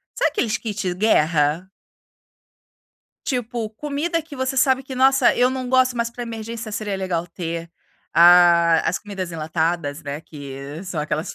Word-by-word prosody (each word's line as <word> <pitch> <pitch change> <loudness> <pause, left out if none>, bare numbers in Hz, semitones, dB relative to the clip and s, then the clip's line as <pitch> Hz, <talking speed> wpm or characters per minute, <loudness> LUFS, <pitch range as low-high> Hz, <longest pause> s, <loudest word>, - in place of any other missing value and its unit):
sabe, - - +2
aqueles 235 - 0
kit 210 -5 -3
guerra? 165 -4 +2 1.6
Tipo 240 -4 -2
comida 295 +8 -2
que 305 -2 -12
você 260 0 -2
sabe 260 0 +3
que 265 - -8
nossa, 265 0 +4
eu 250 +1 +3
não 260 -1 -4
gosto, 255 -1 +3
mas 235 0 -1
para 240 +1 -7
emergência 225 -1 -6
seria 205 -3 -3
legal 180 -3 -2
ter, 170 -1 -6 0.4
ah, 170 -1 +6
as 165 - 0
comidas 195 -4 -6
enlatadas, 160 -1 -2
não 140 - -5
é 145 - -4
que 140 +1 -9
são 180 -4 -4
aquelas 150 +1 -3
195 Hz, 155 wpm, -22 LUFS, 165-245 Hz, 1.6 s, ah